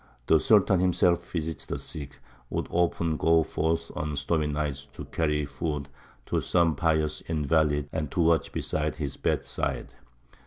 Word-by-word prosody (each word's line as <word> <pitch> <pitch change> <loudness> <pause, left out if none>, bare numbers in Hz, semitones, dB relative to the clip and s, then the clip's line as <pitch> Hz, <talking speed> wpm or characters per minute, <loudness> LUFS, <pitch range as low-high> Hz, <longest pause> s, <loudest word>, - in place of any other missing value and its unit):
The 80 - +5
Sultan 100 -2 +4
himself 90 -1 +2
visited 80 -1 -4
the - - -2
sick, 70 -3 -6
and - - -21 0.3
would - - -2
often 85 -2 +1
go 80 0 +4
forth 80 +2 -1
on 75 -1 -2
stormy 75 +2 0
nights 75 -2 -2
to - - -7
carry 75 -2 0
food 70 0 -4 0.4
to - - 0
some 85 -3 +2
pious 80 0 +1
invalid 75 -2 +1
and 75 -3 -2
to 90 - -4
watch 80 -3 +3
beside 75 0 -2
his 70 -3 -4
bedside. - - -2
80 Hz, 155 wpm, -27 LUFS, 75-85 Hz, 0.4 s, The